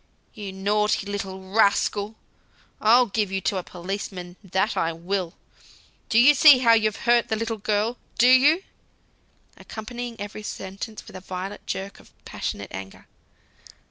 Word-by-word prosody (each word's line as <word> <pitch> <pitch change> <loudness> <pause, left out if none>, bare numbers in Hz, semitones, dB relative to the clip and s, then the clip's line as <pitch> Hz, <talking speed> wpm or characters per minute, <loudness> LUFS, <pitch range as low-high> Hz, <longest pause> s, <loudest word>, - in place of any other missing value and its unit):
"You 205 -4 -7
naughty 205 +2 0
little 190 -2 -6
rascal! 205 0 +2 0.7
I'll 240 +4 +6
give 205 -2 -1
you 195 - -1
to 195 - -1
a 185 - -3
policeman, 180 0 -6
that 190 +3 0
I 165 - 0
will! 175 +1 -3 0.7
Do 220 - +2
you 260 +5 +8
see 290 -1 +8
how 235 -2 +5
you've 215 -2 +2
hurt 240 -1 +4
the 220 - 0
little 225 0 -3
girl? 215 +4 -1 0.2
Do 240 - +5
you?" 285 +8 +5 0.9
accompanying 235 +1 -7
every 205 +1 -6
sentence 200 +1 -7
with - - -13
a 185 - -8
violent 185 +2 -7
jerk 195 +1 -5
of - - -18 0.2
passionate 100 - -5
anger. 95 0 -9
205 Hz, 145 wpm, -24 LUFS, 190-230 Hz, 0.9 s, you